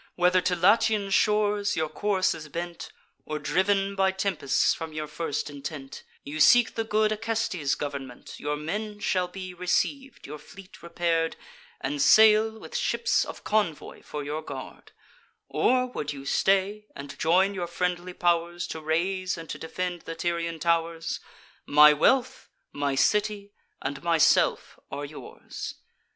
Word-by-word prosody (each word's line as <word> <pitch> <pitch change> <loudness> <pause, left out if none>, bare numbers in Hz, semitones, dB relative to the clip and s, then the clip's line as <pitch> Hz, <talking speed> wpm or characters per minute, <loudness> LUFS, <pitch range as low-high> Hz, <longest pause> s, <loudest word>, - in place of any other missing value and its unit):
Whether 180 +1 +3
to 180 +1 0
Latian 205 +2 +3
shores 210 0 +2
your 160 -1 0
course 190 +4 0
is 155 -1 -9
bent, 170 +2 -6 0.3
Or, 155 - -4
driv'n 195 +7 +1
by 190 0 +3
tempests 190 -7 +1
from 160 -1 -7
your 155 0 -3
first 150 -1 -3
intent, 140 -1 -7 0.2
You 150 +2 -6
seek 240 +8 +6
the 225 - -1
good 215 0 +1
Acestes' 215 -9 -1
government, 140 -4 -7
Your 150 0 -2
men 205 +7 -4
shall 185 -3 0
be 185 0 -8
receiv'd, 265 +10 -2
your 150 +1 -8
fleet 195 +3 -14
repair'd, 170 -1 -1 0.5
And 145 -1 -2
sail, 220 +4 +6
with - - -10
ships 480 -1 +1
of - - -9
convoy 205 -8 -1
for 150 -1 -6
your 150 +2 -4
guard: - - -9 0.6
Or, 255 0 +2
would 150 - -4
you 135 -1 -9
stay, 195 +6 +1
and 140 0 -8
join 185 +5 +3
your 180 -3 -3
friendly 180 +1 -2
pow'rs 175 0 0
To 160 - -5
raise 185 +4 -1
and 165 -1 -8
to - - -6
defend 175 +1 -4
the 165 - -7
Tyrian 170 0 -2
tow'rs, 165 0 -1 0.5
My 150 +1 +8
wealth, 255 - +1 0.2
my 145 -1 -1
city, 205 +6 +1 0.3
and 140 +1 -4
myself 165 -2 +2
are 145 +1 -5
yours. 145 +1 -8
175 Hz, 145 wpm, -26 LUFS, 155-205 Hz, 0.6 s, My